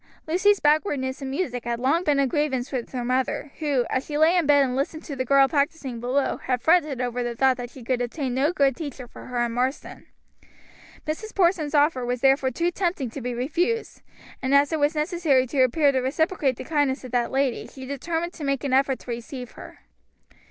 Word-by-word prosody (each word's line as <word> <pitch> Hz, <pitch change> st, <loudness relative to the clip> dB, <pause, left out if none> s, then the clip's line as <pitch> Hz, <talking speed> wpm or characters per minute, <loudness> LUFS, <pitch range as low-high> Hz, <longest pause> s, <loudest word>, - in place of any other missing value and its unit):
Lucy's 370 Hz, +5 st, +3 dB
backwardness 295 Hz, -4 st, +1 dB
in 270 Hz, -, -4 dB
music 265 Hz, -5 st, -3 dB
had 235 Hz, 0 st, -3 dB
long 285 Hz, +8 st, +1 dB
been 295 Hz, -4 st, +2 dB
a 275 Hz, -, +3 dB
grievance 265 Hz, -1 st, -1 dB
with 255 Hz, -4 st, -4 dB
her 245 Hz, -2 st, -3 dB
mother, 260 Hz, +3 st, -1 dB
who, 285 Hz, -6 st, +1 dB
as 260 Hz, -, 0 dB
she 295 Hz, 0 st, -4 dB
lay 320 Hz, +3 st, +4 dB
in 345 Hz, -5 st, +2 dB
bed 285 Hz, -1 st, +6 dB
and 255 Hz, -2 st, -1 dB
listened 300 Hz, +4 st, -2 dB
to 285 Hz, -, -6 dB
the 255 Hz, -, -1 dB
girl 275 Hz, +1 st, +5 dB
practicing 280 Hz, -4 st, -1 dB
below 255 Hz, +4 st, 0 dB
had 255 Hz, -1 st, -2 dB
fretted 305 Hz, -1 st, +2 dB
over 245 Hz, -1 st, -2 dB
the 240 Hz, -1 st, -3 dB
thought 265 Hz, +2 st, +3 dB
that 245 Hz, -1 st, -7 dB
she 250 Hz, 0 st, -12 dB
could 245 Hz, +1 st, -1 dB
obtain 250 Hz, +1 st, -3 dB
no 275 Hz, +5 st, +2 dB
good 275 Hz, -6 st, +2 dB
teacher 275 Hz, -5 st, -7 dB
for -, -, -12 dB
her 245 Hz, -1 st, 0 dB
in 235 Hz, -, -3 dB
Marsden. 255 Hz, +4 st, -3 dB, 1.0 s
Mrs. 375 Hz, +9 st, -5 dB
Porson's 340 Hz, -5 st, +2 dB
offer 290 Hz, -3 st, +3 dB
was 245 Hz, 0 st, -2 dB
therefore 270 Hz, 0 st, +3 dB
too 340 Hz, +7 st, -1 dB
tempting 345 Hz, -, -2 dB
to 275 Hz, -, -7 dB
be 245 Hz, 0 st, -3 dB
refused, 345 Hz, -, -1 dB, 0.4 s
and 270 Hz, +1 st, +2 dB
as 285 Hz, +2 st, +4 dB
it 315 Hz, -, 0 dB
was 295 Hz, +2 st, +2 dB
necessary 305 Hz, -4 st, +2 dB
to 260 Hz, +1 st, 0 dB
appear 280 Hz, +3 st, +4 dB
to 265 Hz, -, +1 dB
reciprocate 280 Hz, +1 st, 0 dB
the -, -, -7 dB
kindness 290 Hz, -4 st, 0 dB
of 255 Hz, -, -9 dB
that 240 Hz, -1 st, +1 dB
lady, 270 Hz, -2 st, -1 dB
she 265 Hz, -1 st, -10 dB
determined 325 Hz, +6 st, -3 dB
to 315 Hz, -, -9 dB
make 275 Hz, -2 st, -1 dB
an 275 Hz, -2 st, -1 dB
effort 270 Hz, 0 st, +3 dB
to 245 Hz, -, -9 dB
receive 240 Hz, +1 st, -6 dB
her. -, -, -12 dB
275 Hz, 215 wpm, -24 LUFS, 255-305 Hz, 1.0 s, bed